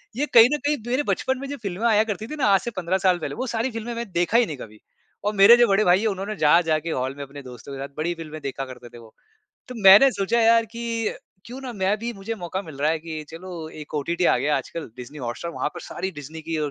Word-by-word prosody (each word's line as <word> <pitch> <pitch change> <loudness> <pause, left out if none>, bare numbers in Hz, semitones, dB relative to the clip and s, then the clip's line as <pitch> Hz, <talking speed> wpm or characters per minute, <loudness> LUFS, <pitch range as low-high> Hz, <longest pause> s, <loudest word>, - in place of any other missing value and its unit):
ये 280 +5 0
कहीं 230 -1 +9
न - - +2
कहीं 295 0 +2
मेरे 255 +4 +1
बचपन 265 -2 -1
में 275 - -6
जो 285 - -5
फ़िल्में 200 -1 -4
आया 215 -2 +4
करती 220 0 -4
थीं 305 - -6
ना 280 - +1
आज 195 -1 +5
से 240 - -4
15 185 -2 -1
साल 185 -2 +2
पहले, - - -5
वो 255 +2 -3
सारी 235 +2 -1
फ़िल्में 225 +1 -5
मैं 230 -3 -5
देखा 175 +5 +2
ही 240 - +4
नहीं 150 -8 -6
कभी। 110 -3 -11 0.5
और 210 - +1
मेरे 200 +4 +9
जो 240 0 +5
बड़े 200 +1 +3
भाई 180 -1 +4
हैं, 225 - +1
उन्होंने 200 +1 -3
जा-जा 160 +1 +4
के 165 +2 -6
हॉल 130 -1 -2
में 140 - -6
अपने 140 +1 -10
दोस्तों 125 +1 -10
के 135 - -7
साथ 140 0 -7
बड़ी 165 +3 -1
फ़िल्में 155 -2 -8
देखा 135 -1 -4
करते 125 -2 -11
थे 120 - -13
वो। 115 -2 -15 0.6
तो 250 - -7
मैंने 195 +8 +9
सोचा 200 +4 0
यार, 230 0 +5
कि 230 0 -3 0.3
क्यों 250 +3 -8
ना 260 -2 -6
मैं 200 -1 0
भी 235 +2 -4
मुझे 210 +1 -5
मौका 185 -1 -5
मिल 160 -6 -11
रहा 150 +2 +2
है 165 - 0
कि 160 -1 -6
चलो 165 -1 -8
एक 155 -1 -11
ओटीटी 170 +5 -1
आ - - +4
गया 150 0 +1
आजकल 165 - -5
डिज़नी 125 +4 -9
हॉटस्टार। 125 +6 -5
वहाँ - - -2
पर - - -7
सारी 190 +2 -5
डिज़नी 155 -1 -9
की 165 -1 -1
औ 150 -1 -1
185 Hz, 275 wpm, -23 LUFS, 155-225 Hz, 0.6 s, कहीं